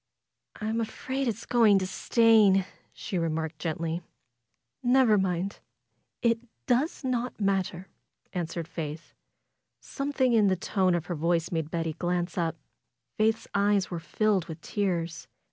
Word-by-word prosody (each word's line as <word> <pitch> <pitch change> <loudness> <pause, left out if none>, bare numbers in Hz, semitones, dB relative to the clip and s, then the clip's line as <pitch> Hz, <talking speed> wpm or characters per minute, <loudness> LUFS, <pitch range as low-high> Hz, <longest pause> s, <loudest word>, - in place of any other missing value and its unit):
"I'm 220 +2 -1
afraid 260 +4 -3
it's 230 0 -3
going 225 -5 +5
to 190 - 0
stain," 210 -1 +4 0.3
she 190 -5 -4
remarked, 160 -1 -2
gently. 165 +1 -2 0.8
"Nevermind! 200 -7 +3 0.6
It 230 -1 +3 0.3
does 270 +6 +1
not 250 -2 -2
matter," 190 -2 0 0.5
answered 170 -2 -3
Faith. 160 -2 -6 0.7
Something 275 -3 0
in 215 -3 +5
the 190 - +3
tone 185 0 +1
of 170 -1 -2
her 175 - -3
voice 165 +1 0
made 160 -3 -1
Betty 165 -1 -2
glance 175 +1 -2
up. 165 -2 0 0.6
Faith's 220 +1 +1
eyes 200 -1 +2
were 175 - -3
filled 195 +2 0
with 160 0 -7
tears. 170 -8 -2
190 Hz, 130 wpm, -28 LUFS, 170-225 Hz, 0.8 s, going